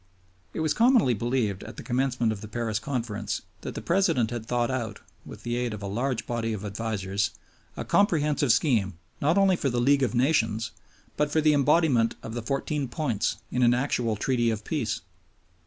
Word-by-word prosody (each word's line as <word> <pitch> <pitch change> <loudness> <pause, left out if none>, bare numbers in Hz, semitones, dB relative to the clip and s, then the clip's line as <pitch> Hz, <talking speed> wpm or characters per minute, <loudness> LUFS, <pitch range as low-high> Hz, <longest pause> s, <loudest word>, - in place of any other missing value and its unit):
It - - -2
was 155 -2 +1
commonly 235 - +4
believed 115 -3 -1
at - - -10
the - - -7
commencement 125 -2 0
of 105 -2 -5
the 110 - -7
Paris 110 0 -2
Conference 120 -3 -3 0.2
that - - -6
the - - -5
President 170 - +2
had 115 -2 -5
thought 120 0 0
out, 115 -5 -3 0.3
with - - -10
the 120 0 -2
aid 120 -3 -1
of 105 - -9
a - - -3
large 120 +5 -2
body 115 -2 -2
of 105 -1 -5
advisers, 105 -1 -2 0.5
a - - -4
comprehensive 150 - +2
scheme 105 - +2 0.2
not 160 +6 +3
only 195 -1 +5
for 140 - -1
the 120 -1 0
League 140 +3 +4
of 125 -3 0
Nations, 115 -5 +1 0.5
but 150 0 +2
for 160 - +1
the 155 -1 +4
embodiment 140 -5 +3
of 110 - -6
the 120 - -3
Fourteen 135 +3 -2
Points 120 -7 -1
in 125 - 0
an 120 0 +5
actual 120 -4 0
Treaty 120 +2 +1
of 110 -1 -2
Peace. 135 -9 -2
120 Hz, 190 wpm, -27 LUFS, 110-140 Hz, 0.5 s, only